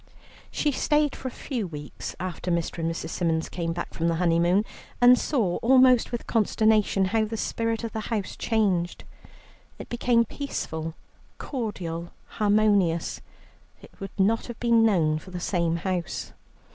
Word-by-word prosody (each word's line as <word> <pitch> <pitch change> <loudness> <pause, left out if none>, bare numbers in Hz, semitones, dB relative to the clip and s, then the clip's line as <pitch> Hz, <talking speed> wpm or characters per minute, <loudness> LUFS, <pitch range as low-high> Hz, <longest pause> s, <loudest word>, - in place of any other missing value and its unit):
She 295 - 0
stayed 295 +1 +1
for 260 - -6
a - - -4
few 235 -7 -4
weeks 150 -3 -7
after 185 0 -4
Mr. 170 0 -1
and 165 0 0
Mrs. 165 -1 -4
Symons 165 -2 -1
came 170 -2 -3
back 175 +1 -5
from 165 - -1
the 165 - +1
honeymoon, 175 +4 +2 0.3
and 245 0 +8
saw 230 - 0
almost 255 0 +5
with 240 - -4
consternation, 215 -2 +2
how 215 +3 +1
the 225 +1 -5
spirit 230 +1 -2
of 230 - -3
the 220 - -4
house 215 -5 -2
changed. 195 -6 0 0.7
It - - -9
became 240 -1 +2
peaceful, 165 - -5 0.4
cordial, 180 - -5
harmonious; 205 -5 +1 0.6
it - - -14
would 195 - -5
not 220 +4 +2
have 240 -2 -8
been 235 -1 +4
known 165 -8 +3
for 185 - -13
the 180 -1 -5
same 170 -2 0
house. 180 0 -3
200 Hz, 155 wpm, -26 LUFS, 170-230 Hz, 0.7 s, and